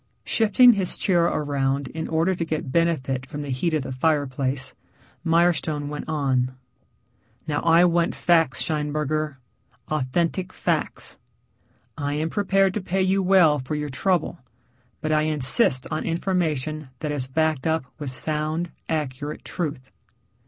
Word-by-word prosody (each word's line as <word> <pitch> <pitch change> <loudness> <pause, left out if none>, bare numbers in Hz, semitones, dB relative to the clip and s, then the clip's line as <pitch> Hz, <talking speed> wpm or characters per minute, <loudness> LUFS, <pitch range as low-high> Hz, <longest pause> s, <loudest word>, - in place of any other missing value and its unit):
Shifting 235 +3 +5
his 195 -4 +1
chair 175 -3 +2
around 140 -3 0
in 160 0 -5
order 165 +4 +1
to 175 - -2
get 155 -4 -3
benefit 135 -6 0
from 145 +3 -6
the 140 - -5
heat 160 +6 0
of 150 - 0
the 130 - -6
fireplace, 135 -2 -1 0.5
Mirestone 165 -3 +1
went 150 +1 -6
on. 130 -4 0 0.9
"Now 145 -1 -1
I 165 +1 +5
want 170 -1 +1
facts, 165 -6 +2
Scheinberger, 150 0 -1 0.5
authentic 165 +6 -1
facts. - - -1 0.8
I 145 0 -1
am 155 +2 -2
prepared 195 -1 +2
to 210 - -2
pay 190 +1 0
you 190 +1 +2
well 180 -6 +5
for 130 +4 -4
your 150 0 -3
trouble, 175 +5 0 0.6
but 155 - -1
I 155 0 +3
insist 135 -4 +2
on 155 - -2
information 155 -5 -1
that 150 - -2
is 135 -3 -3
backed 155 +1 0
up 160 -3 0
with 145 -3 -4
sound, 155 +5 0 0.2
accurate 150 -1 -3
truth." 145 -7 -4
155 Hz, 140 wpm, -24 LUFS, 140-170 Hz, 0.9 s, Shifting